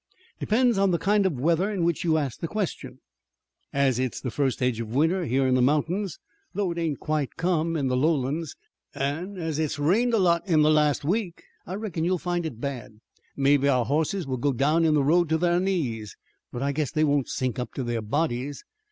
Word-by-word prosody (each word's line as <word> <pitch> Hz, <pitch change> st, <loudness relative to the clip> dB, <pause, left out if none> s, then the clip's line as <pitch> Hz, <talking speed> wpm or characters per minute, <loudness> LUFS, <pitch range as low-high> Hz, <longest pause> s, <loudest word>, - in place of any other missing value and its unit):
"Depends 235 Hz, -1 st, +2 dB
on 195 Hz, 0 st, +3 dB
the 175 Hz, -, +2 dB
kind 200 Hz, +2 st, +2 dB
of 150 Hz, -9 st, -3 dB
weather 170 Hz, +7 st, +2 dB
in 190 Hz, -5 st, -1 dB
which 170 Hz, -2 st, 0 dB
you 160 Hz, -2 st, +2 dB
ask 140 Hz, -6 st, -3 dB
the 165 Hz, -, -3 dB
question. 210 Hz, 0 st, -4 dB, 0.7 s
As 135 Hz, -3 st, +1 dB
it's 130 Hz, -1 st, -2 dB
the 125 Hz, -, -4 dB
fust 135 Hz, +1 st, 0 dB
edge 125 Hz, -3 st, 0 dB
of 115 Hz, +1 st, -5 dB
winter 165 Hz, +5 st, +2 dB
here 135 Hz, 0 st, +1 dB
in 130 Hz, -, +2 dB
the 130 Hz, -, +3 dB
mountains, 160 Hz, +7 st, 0 dB, 0.4 s
though 200 Hz, -3 st, 0 dB
it 170 Hz, -, -4 dB
ain't 160 Hz, -4 st, -2 dB
quite 150 Hz, -3 st, -2 dB
come 165 Hz, -1 st, 0 dB
in 140 Hz, -3 st, 0 dB
the 125 Hz, -, 0 dB
lowlands, 150 Hz, +2 st, 0 dB, 0.4 s
an' 160 Hz, +9 st, -3 dB
as 160 Hz, -3 st, -3 dB
it's 155 Hz, -1 st, -1 dB
rained 215 Hz, +12 st, +2 dB
a -, -, +3 dB
lot 175 Hz, -2 st, +2 dB
in 155 Hz, -3 st, +4 dB
the 155 Hz, -, +4 dB
last 150 Hz, -2 st, +2 dB
week, 185 Hz, 0 st, -2 dB, 0.2 s
I 185 Hz, -, -4 dB
reckon 195 Hz, -6 st, -3 dB
you'll 180 Hz, +2 st, +1 dB
find 175 Hz, -1 st, -2 dB
it 120 Hz, -8 st, -9 dB
bad. 120 Hz, -5 st, -6 dB, 0.4 s
Mebbe 140 Hz, 0 st, +3 dB
our 130 Hz, -4 st, +3 dB
hosses 160 Hz, -, 0 dB
will 130 Hz, -1 st, -3 dB
go 140 Hz, +3 st, 0 dB
down 150 Hz, +6 st, +2 dB
in 155 Hz, -1 st, +3 dB
the 145 Hz, -, +3 dB
road 170 Hz, +3 st, +3 dB
to 160 Hz, -, +2 dB
thar 175 Hz, +1 st, +2 dB
knees, 130 Hz, -, -2 dB, 0.3 s
but 120 Hz, -, -4 dB
I 140 Hz, -, +1 dB
guess 145 Hz, 0 st, -1 dB
they 155 Hz, -1 st, +1 dB
won't 145 Hz, -3 st, +1 dB
sink 130 Hz, -2 st, -2 dB
up 125 Hz, -, -5 dB
to 130 Hz, -, -3 dB
thar 120 Hz, -1 st, -2 dB
bodies. 140 Hz, +3 st, -2 dB
155 Hz, 220 wpm, -26 LUFS, 135-175 Hz, 0.7 s, in